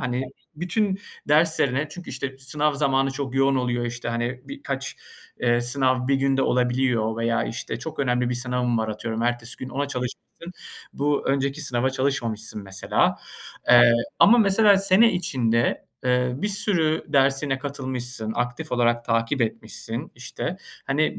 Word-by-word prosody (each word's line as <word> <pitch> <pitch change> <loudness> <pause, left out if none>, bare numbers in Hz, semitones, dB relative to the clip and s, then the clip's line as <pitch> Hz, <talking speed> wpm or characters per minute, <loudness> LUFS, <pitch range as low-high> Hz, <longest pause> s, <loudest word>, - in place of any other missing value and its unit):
hani, 125 +1 -1 0.3
bütün 190 +4 -1 0.3
derslerine 150 -2 +3
çünkü, 180 +3 -9
işte, 135 -1 -5
sınav 150 +2 -1
zamanı 135 -1 +1
çok 135 -1 -5
yoğun 135 0 +3
oluyor, 120 -1 -1
işte, 120 0 -5
hani, 120 +2 -2
birkaç, 135 0 -5 0.4
eee, 120 -1 +2
sınav 130 +1 +1
bir 140 - +3
günde 135 0 +1
olabiliyor 125 -3 +1
veya, 115 0 0
işte, 115 0 -5
çok 160 - -7
önemli 125 -2 +1
bir - - 0
sınavım 125 -1 0
var, 110 - -1
atıyorum 110 +1 -3
ertesi 120 -1 -2
gün 130 - -7
ona 140 +1 -2
çalışmışsın, 125 +6 -6 0.4
bu 145 0 0
önceki 140 +2 0
sınava 130 -2 0
çalışmamışsın 115 -6 -2
mesela. 95 0 0 0.5
Eee, 120 -1 +8 0.3
ama 240 +4 +7
mesela 205 -1 +5
sene 195 +4 +5
içinde, 125 -10 0 0.2
eee, 125 0 +2
bir 205 +10 -2
sürü 170 -6 +1
dersine 135 -1 +2
katılmışsın, 130 -5 -4
aktif 125 +6 -3
olarak 120 -1 +2
takip 115 +4 0
etmişsin, 110 - -4
işte. - - -5 0.3
Hani, 145 +3 0
130 Hz, 145 wpm, -24 LUFS, 120-145 Hz, 0.5 s, Eee